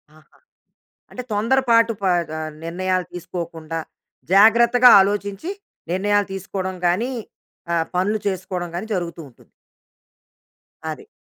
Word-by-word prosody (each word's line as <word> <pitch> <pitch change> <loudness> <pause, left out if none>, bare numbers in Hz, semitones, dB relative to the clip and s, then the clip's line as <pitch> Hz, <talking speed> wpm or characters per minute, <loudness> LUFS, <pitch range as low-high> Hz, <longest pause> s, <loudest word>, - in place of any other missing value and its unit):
ఆహా! 155 - -23 0.7
అంటే, 250 - -6
తొందరపాటు 230 +1 +3
ప - - -3 0.2
గ - - -8 0.3
నిర్ణయాలు 185 +2 -1
తీసుకోకుండా, 165 -2 -6 0.6
జాగ్రత్తగా 235 +4 +7
ఆలోచించి 200 - -1 0.4
నిర్ణయాలు 205 +2 +1
తీసుకోవడం 190 0 -4
గానీ, 215 +9 +1 0.6
ఆహ్, 165 -1 +1
పనులు 205 +4 +1
చేసుకోవడం 185 -2 -4
గానీ 180 +5 -4
జరుగుతూ 170 -3 -4
ఉంటుంది. 120 - -23 1.3
అది. - - -6
190 Hz, 100 wpm, -21 LUFS, 175-220 Hz, 1.3 s, జాగ్రత్తగా